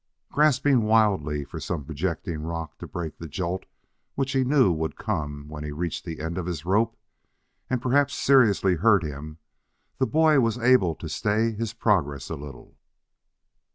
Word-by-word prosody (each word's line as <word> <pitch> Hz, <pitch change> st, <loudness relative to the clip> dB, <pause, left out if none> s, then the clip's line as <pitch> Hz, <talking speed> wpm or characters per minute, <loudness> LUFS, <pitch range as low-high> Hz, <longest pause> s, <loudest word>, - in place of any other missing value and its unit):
Grasping 145 Hz, -3 st, +3 dB
wildly 100 Hz, -10 st, +2 dB
for -, -, -8 dB
some 75 Hz, -6 st, -4 dB
projecting 80 Hz, +1 st, -3 dB
rock 80 Hz, -1 st, -5 dB
to -, -, -7 dB
break 80 Hz, -3 st, -6 dB
the 80 Hz, -, -7 dB
jolt 90 Hz, +4 st, -4 dB, 0.5 s
which 135 Hz, -1 st, -1 dB
he 130 Hz, -1 st, +2 dB
knew 130 Hz, -6 st, +4 dB
would 80 Hz, -1 st, -2 dB
come 75 Hz, -8 st, -4 dB
when 75 Hz, 0 st, -7 dB
he 75 Hz, -, -5 dB
reached 80 Hz, +2 st, -4 dB
the 80 Hz, -3 st, -6 dB
end 80 Hz, +3 st, -3 dB
of 90 Hz, -, -4 dB
his 85 Hz, -3 st, -4 dB
rope, 110 Hz, +5 st, +1 dB, 0.7 s
and 125 Hz, -1 st, -1 dB
perhaps 140 Hz, +2 st, +2 dB
seriously 105 Hz, -9 st, +4 dB
hurt 100 Hz, 0 st, +4 dB
him, 75 Hz, +1 st, -7 dB, 0.6 s
the 130 Hz, -, +2 dB
boy 155 Hz, -2 st, +4 dB
was 115 Hz, -3 st, +1 dB
able 120 Hz, -9 st, +3 dB
to 80 Hz, -, -8 dB
stay 110 Hz, +7 st, 0 dB
his 110 Hz, 0 st, -4 dB
progress 85 Hz, -, 0 dB
a -, -, -2 dB
little. 70 Hz, -3 st, -11 dB
90 Hz, 165 wpm, -25 LUFS, 80-115 Hz, 0.7 s, knew